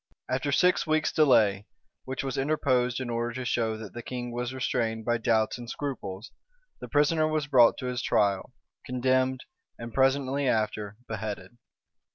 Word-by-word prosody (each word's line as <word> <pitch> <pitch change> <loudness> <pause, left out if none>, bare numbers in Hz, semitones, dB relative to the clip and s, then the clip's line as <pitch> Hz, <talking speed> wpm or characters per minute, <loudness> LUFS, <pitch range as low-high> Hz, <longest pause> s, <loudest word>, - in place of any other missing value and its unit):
} - - -33
After 140 +2 -2
six 180 +4 +3
weeks' 155 0 +1
delay, 105 -9 +3 0.4
which 130 +1 -4
was 135 -2 -3
interposed 130 -4 +1
in 125 -2 -4
order 120 0 -2
to 130 -1 -4
show 115 -2 0
that 110 -4 -9
the 120 - -6
king 120 0 -5
was 120 +1 -3
restrained 115 -4 -2
by 120 0 +1
doubts 115 0 +1
and 120 -1 -8
scruples, 115 -9 -5 0.5
the - - -7
prisoner 155 +2 +3
was 155 -2 0
brought 130 -5 +5
to - - -6
his 125 -1 -2
trial, 100 -5 +1 0.3
condemned, 130 +1 +1 0.4
and 115 -1 -8
presently 135 +1 +2
after 105 -3 -1
beheaded. 105 -1 -5
125 Hz, 165 wpm, -28 LUFS, 110-135 Hz, 0.5 s, brought